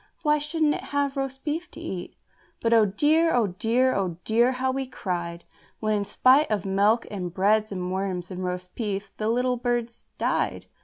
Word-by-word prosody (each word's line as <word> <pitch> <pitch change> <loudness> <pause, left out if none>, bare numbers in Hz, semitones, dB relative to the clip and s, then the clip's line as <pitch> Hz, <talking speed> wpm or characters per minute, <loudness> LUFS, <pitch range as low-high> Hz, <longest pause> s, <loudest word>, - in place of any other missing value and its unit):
why 300 -1 +3
shouldn't 300 0 +1
it - - -5
have 285 -1 -1
roast 270 -1 -4
beef 330 +3 -3
to - - -12
eat?" 190 - -6 0.4
But, 230 0 +1
oh 220 -2 +6
dear! 310 +11 +3
oh 240 -3 +3
dear! 230 +7 +1
oh 185 -4 -1
dear! 235 +3 +3
how 260 +1 0
we 265 0 -3
cried 175 -7 -4 0.3
When 215 -1 0
in 205 -1 0
spite 255 +8 +4
of 210 -3 -1
milk 205 +4 +3
and 180 -4 -4
bread 210 +4 +2
and 180 -2 -3
worms 185 -1 -3
and 185 0 -5
roast 180 0 -4
beef, 205 -3 -3
the 215 0 -1
little 250 +2 +1
birds 240 -1 -2
died! - - -1
225 Hz, 190 wpm, -26 LUFS, 190-260 Hz, 0.4 s, oh